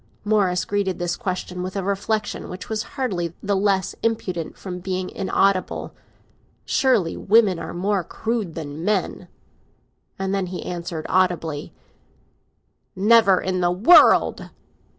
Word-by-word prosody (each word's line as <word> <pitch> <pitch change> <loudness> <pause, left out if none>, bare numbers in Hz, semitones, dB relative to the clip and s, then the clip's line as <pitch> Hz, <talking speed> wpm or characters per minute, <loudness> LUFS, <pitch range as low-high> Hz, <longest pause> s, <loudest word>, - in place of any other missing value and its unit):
Morris 200 -4 +2
greeted 200 -2 -1
this 175 0 -2
question 185 -4 -4
with 185 +2 -5
a 195 - -2
reflexion 205 +2 -2
which 180 0 -8
was 220 -1 -1 0.2
hardly 180 -11 -2
the 200 0 0
less 195 -1 +1
impudent 185 -7 -2
from 180 -2 -6
being 185 0 -3
inaudible. 195 0 0 0.7
"Surely, 245 - +2
women 205 -4 +3
are 165 - -6
more 190 +2 -1
crude 220 -2 -3
than 155 0 -6
men!" 210 +3 -1 0.9
And 195 0 -2
then 195 -2 -1
he 180 0 -6
answered 170 -2 -5
audibly: 175 -5 0 1.2
"Never 200 -1 +5
in 185 -1 -2
the 175 - +3
world!" 205 - +5
190 Hz, 130 wpm, -22 LUFS, 180-205 Hz, 1.2 s, Never